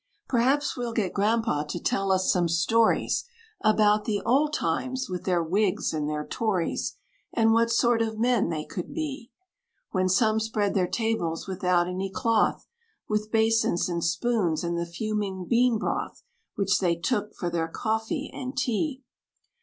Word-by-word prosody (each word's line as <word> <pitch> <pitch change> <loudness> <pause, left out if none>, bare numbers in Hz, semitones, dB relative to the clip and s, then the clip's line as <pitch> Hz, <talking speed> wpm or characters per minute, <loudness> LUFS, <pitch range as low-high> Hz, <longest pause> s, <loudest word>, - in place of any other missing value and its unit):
"Perhaps 270 +4 +2
we'll 240 -2 -3
get 205 -5 -1
Grandpa' 210 -7 +1
to 150 +4 -4
tell 195 +2 0
us 185 0 +3
some 175 -2 +2
stories 220 +8 +2 0.4
About 215 -1 +4
the 210 -2 0
old 280 +6 +3
times, 255 - -1
with 180 -1 -5
their 180 -3 +2
Whigs 195 +4 0
and 150 -1 -1
their 150 0 -3
Tories; 195 -7 -1 0.4
And 225 -1 +4
what 230 +1 +3
sort 235 0 +3
of 220 -1 -1
men 240 -5 +2
they 155 -2 -3
could 180 - -6
be; 280 -7 -4 0.6
When 185 -1 +1
some 220 +3 +3
spread 215 -2 -1
their 185 -3 +2
tables 220 -8 -2
without 180 -2 +1
any 185 +2 -3
cloth, 220 +2 +1 0.4
With 210 0 -1
basins 225 -5 +2
and 170 -2 -2
spoons, 170 -2 0
and 170 0 -1
the 170 0 -2
fuming 195 0 -3
bean 240 +2 +3
broth, - - -3 0.3
Which 195 -1 +2
they 175 -3 +2
took 210 +5 -2
for 175 -2 -3
their 165 -1 -1
coffee 220 - -2
and 260 +1 -6
tea. 265 +3 -1
210 Hz, 160 wpm, -26 LUFS, 180-230 Hz, 0.6 s, About